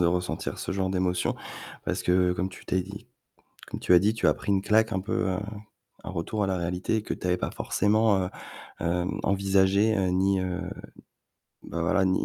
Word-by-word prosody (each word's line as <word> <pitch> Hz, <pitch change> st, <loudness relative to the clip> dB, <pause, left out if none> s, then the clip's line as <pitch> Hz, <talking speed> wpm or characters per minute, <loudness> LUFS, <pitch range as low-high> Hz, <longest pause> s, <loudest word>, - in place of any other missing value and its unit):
de 85 Hz, -, +4 dB
ressentir 90 Hz, +1 st, -1 dB
ce -, -, -3 dB
genre 95 Hz, -1 st, 0 dB
d'émotion, 90 Hz, -1 st, 0 dB, 0.5 s
parce -, -, -1 dB
que 90 Hz, 0 st, +3 dB
comme 90 Hz, +1 st, -1 dB
tu 95 Hz, -, -13 dB
t'es 95 Hz, -, +1 dB
dit 100 Hz, +2 st, -10 dB, 0.6 s
comme -, -, -6 dB
tu 90 Hz, -, +4 dB
as 90 Hz, -, +9 dB
dit, 105 Hz, +4 st, +2 dB
tu 115 Hz, -, 0 dB
as -, -, +4 dB
pris 100 Hz, -, -2 dB
une 95 Hz, -, +3 dB
claque 110 Hz, +3 st, +3 dB
un 95 Hz, -, 0 dB
peu, 95 Hz, 0 st, -1 dB
heu, 90 Hz, -, -1 dB, 0.7 s
un -, -, -5 dB
retour 95 Hz, +4 st, -2 dB
à -, -, 0 dB
la 95 Hz, -1 st, 0 dB
réalité 90 Hz, +5 st, -1 dB
que -, -, -3 dB
tu -, -, -6 dB
avais 90 Hz, 0 st, +2 dB
pas -, -, -2 dB
forcément, 105 Hz, -1 st, +2 dB
heu, -, -, -4 dB, 0.5 s
hem, 90 Hz, +2 st, -1 dB
envisagé, 100 Hz, +2 st, +3 dB
heu, 95 Hz, -1 st, +1 dB
ni, 95 Hz, +1 st, +2 dB
heu, 90 Hz, -1 st, -2 dB, 1.0 s
bah 85 Hz, -, -5 dB
voilà, 95 Hz, +4 st, +2 dB
ni 95 Hz, 0 st, +2 dB
95 Hz, 205 wpm, -27 LUFS, 90-100 Hz, 1.0 s, as